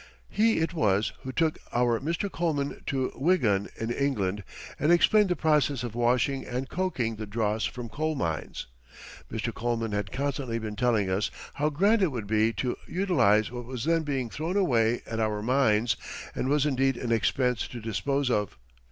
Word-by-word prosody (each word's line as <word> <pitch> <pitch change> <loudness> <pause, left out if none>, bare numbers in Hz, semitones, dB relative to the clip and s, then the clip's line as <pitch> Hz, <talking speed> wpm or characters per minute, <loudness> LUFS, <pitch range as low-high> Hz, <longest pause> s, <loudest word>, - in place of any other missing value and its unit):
He 225 +1 +3
it 165 +1 0
was 105 - +1
who 130 - -5
took 160 +3 0
our 120 -1 +2
Mr. 165 +7 -1
Coleman 155 -5 -1
to 130 -2 0
Wigan 125 - +2
in 115 +1 -2
England 105 -8 -1 0.4
and 150 +4 +3
explained 205 +4 +5
the 180 - +2
process 150 -6 +2
of 120 -3 -4
washing 125 +3 +1
and 125 +2 -4
coking 130 -13 -2
the 110 0 -6
dross 110 +1 0
from 120 -1 -5
coal 155 +7 -2
mines. 80 - -3 0.7
Mr. 115 +1 -2
Coleman 115 -1 -2
had 100 -2 -2
constantly 135 -3 -2
been 110 -2 -5
telling 115 -3 +2
us 95 +2 0 0.2
how 150 +2 +1
grand 200 +9 +3
it 185 -5 +3
would 120 -5 -4
be 110 +2 +2
to 125 +3 -1
utilize 120 - +2
what 120 -1 -6
was 125 0 -5
then 165 0 +3
being 135 -5 -2
thrown 165 +6 -2
away 120 - +2
at 115 - -4
our 105 -1 0
mines, 115 -2 +3 0.4
and 130 - -2
was 145 0 +3
indeed 135 -2 +1
an 120 -1 -3
expense 125 +1 +1
to 120 - -8
dispose 125 +5 -1
of. 105 - -1
125 Hz, 180 wpm, -28 LUFS, 110-150 Hz, 0.7 s, explained